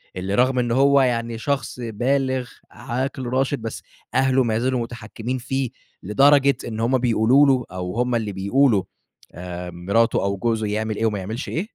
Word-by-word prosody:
اللي 95 +2 -2
رغم 130 +1 +3
إن 120 -1 0
هو 140 +2 +4
يعني 115 -2 0
شخص 135 -1 -3
بالغ، 130 +3 -1 0.2
عاقل 130 +3 -4
راشد، 130 +1 0
بس 115 0 -5 0.3
أهله 130 0 +3
ما 110 -1 0
زالوا 130 0 0
متحكِّمين 115 +1 -5
فيه، 130 +1 -2 0.3
لدرجة 140 +6 +4
إن 110 -1 -5
هم 120 +3 +2
بيقولوا 125 +3 +4
له 130 -3 +2
أو 90 +2 -5
هم 125 0 +1
اللي 110 -3 -1
بيقولوا، 100 +2 +2 0.5
آآ 90 +1 -7
مراته 100 +8 +1
أو 100 0 -1
جوزه 110 -1 -1
يعمل 110 +1 -2
إيه 115 - -1
وما 105 -2 0
يعملش 110 +8 -5
إيه؟ 165 - -2
120 Hz, 170 wpm, -22 LUFS, 110-130 Hz, 0.5 s, هو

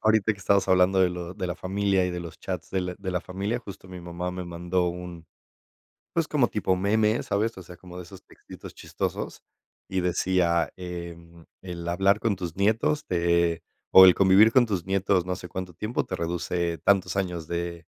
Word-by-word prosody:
ahorita 110 0 +3
que 100 - -13
estamos 100 0 +2
hablando 95 +1 +4
de 90 -1 +4
lo 90 0 -6
de 90 - -3
la 90 - -3
familia, 95 0 0
y 90 - -3
de 90 - -4
los 85 -1 -9
chats - - -5
de 95 - 0
la 90 0 -4
de 95 -2 -5
la 90 -1 -1
familia, 100 +6 -3
justo, 100 -5 -11
mi 90 -1 -9
mamá 85 +1 -5
me 90 0 -5
mandó 85 +1 -1
un, 85 -1 -6 0.9
pues, 165 -3 0
como 135 -5 +3
tipo 95 -4 0
meme, 105 +4 +2
¿sabes?, 105 +2 -1
o - - -7
sea, 90 +1 -12
como 90 +1 -12
de 90 - -6
esos 95 +2 -13
textitos - - -13
chistosos, - - -5 0.5
y 95 - -1
decía: 90 -1 +1
"Em, 85 -2 -8 0.2
el 85 -2 -7
hablar 95 +4 +2
con 105 -4 0
tus 85 -3 -5
nietos 115 +10 +1
te, 85 -1 +1 0.3
o 95 - +10
el 90 - +7
convivir 100 +4 +6
con 130 -2 +6
tus 100 -7 -3
nietos 95 -1 +1
no 90 0 -2
sé 90 -1 -9
cuánto 90 0 -6
tiempo 105 +8 -2
te 95 - -4
reduce 85 0 -2
tantos 100 +4 +1
años 90 -4 -2
de, 85 0 -4
90 Hz, 200 wpm, -26 LUFS, 85-100 Hz, 0.9 s, o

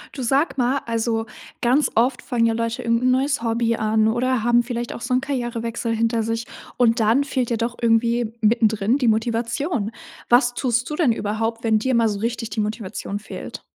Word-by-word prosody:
Du 265 - -5
sag 275 +4 +1
mal, 255 +3 +2
also, 225 -1 -1 0.4
ganz 260 +5 +3
oft 245 +3 +2
fangen 240 -3 0
ja 230 - +2
Leute 230 +1 -2
irgendein 230 +2 +2
neues 275 +1 +1
Hobby 230 0 0
an 215 0 +2
oder 245 +1 0
haben 240 0 +4
vielleicht 240 0 -4
auch - - -8
so 240 - -5
'n 255 - +2
Karrierewechsel 240 -3 -3
hinter 230 0 +1
sich 230 +1 -2 0.3
und 235 -1 +3
dann 225 +5 +3
fehlt 260 -4 -2
ja 235 - 0
doch 235 +2 -2
irgendwie 235 0 +2
mittendrin 220 +1 +2
die 250 - +1
Motivation. 230 - 0 0.4
Was 245 0 +4
tust 245 -1 0
du - - -2
denn 300 -7 +3
überhaupt, 225 +2 -2
wenn 220 -1 +3
dir 260 +3 0
mal 230 -1 +3
so 205 -1 -3
richtig 230 0 -3
die - - -3
Motivation 210 -1 -3
fehlt? 210 - -8
230 Hz, 190 wpm, -22 LUFS, 225-245 Hz, 0.4 s, haben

